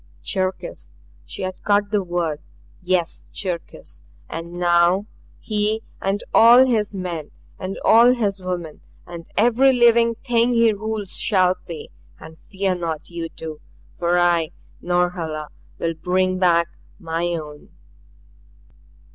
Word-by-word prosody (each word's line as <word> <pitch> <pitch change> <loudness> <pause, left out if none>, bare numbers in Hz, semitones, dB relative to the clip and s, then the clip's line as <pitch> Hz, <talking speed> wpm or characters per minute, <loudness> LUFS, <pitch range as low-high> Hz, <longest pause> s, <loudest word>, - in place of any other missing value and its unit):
"Cherkis!" 185 - -2 0.4
She 65 - -7
had 185 0 -5
caught 205 0 +1
the 210 -2 +2
word. 175 -4 -2 0.4
"Yes 175 -3 -1
Cherkis! 180 -4 -4 0.3
And 165 +1 -7
now 175 +2 +3 0.3
he 215 +1 -1 0.2
and 195 +1 -1
all 240 +3 +8
his 215 -5 0
men 175 -5 -4 0.3
and 185 +1 -5
all 235 +2 +7
his 200 -5 -1
women 175 -4 -5 0.2
and 170 -1 -9
every 245 +5 +5
living 235 -2 +4
thing 240 0 +1
he 230 -1 +4
rules 215 -1 -3
shall 185 -4 +3
pay. 165 -4 -7 0.3
And 160 0 -12
fear 195 -1 -1
not 165 -2 -4
you 170 -1 -4
two. 155 -2 -8 0.4
For 175 0 +2
I, 170 -2 +2 0.3
Norhala, 175 -4 -1 0.3
will 165 0 -1
bring 185 +3 0
back 170 -2 +3 0.3
my 165 -2 -2
own. 150 -2 -8
185 Hz, 125 wpm, -22 LUFS, 170-210 Hz, 0.4 s, all